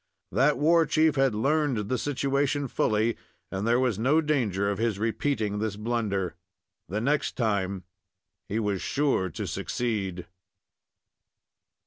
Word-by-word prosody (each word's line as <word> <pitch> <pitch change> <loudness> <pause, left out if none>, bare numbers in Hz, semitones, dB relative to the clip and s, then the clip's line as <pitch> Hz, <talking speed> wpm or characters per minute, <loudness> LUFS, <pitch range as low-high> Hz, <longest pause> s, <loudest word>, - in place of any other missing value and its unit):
That 135 +2 +3
war 165 +3 +4
chief 155 0 +3
had 135 -5 +2
learned 135 -3 +1
the 130 - 0
situation 140 0 0
fully, 110 -1 +1 0.3
and 95 +3 -2
there 120 +1 +4
was 125 -6 +1
no 135 +7 +3
danger 120 - 0
of 100 0 -1
his 115 -3 0
repeating 110 -1 -1
this 110 -2 -2
blunder. 105 -5 -1 0.6
The 105 +4 -1
next 140 +6 0
time 100 -5 0 0.7
he 105 - -1
was 105 -4 -1
sure 140 -10 +1
to - - -5
succeed. 100 -7 -2
115 Hz, 130 wpm, -27 LUFS, 100-140 Hz, 0.7 s, war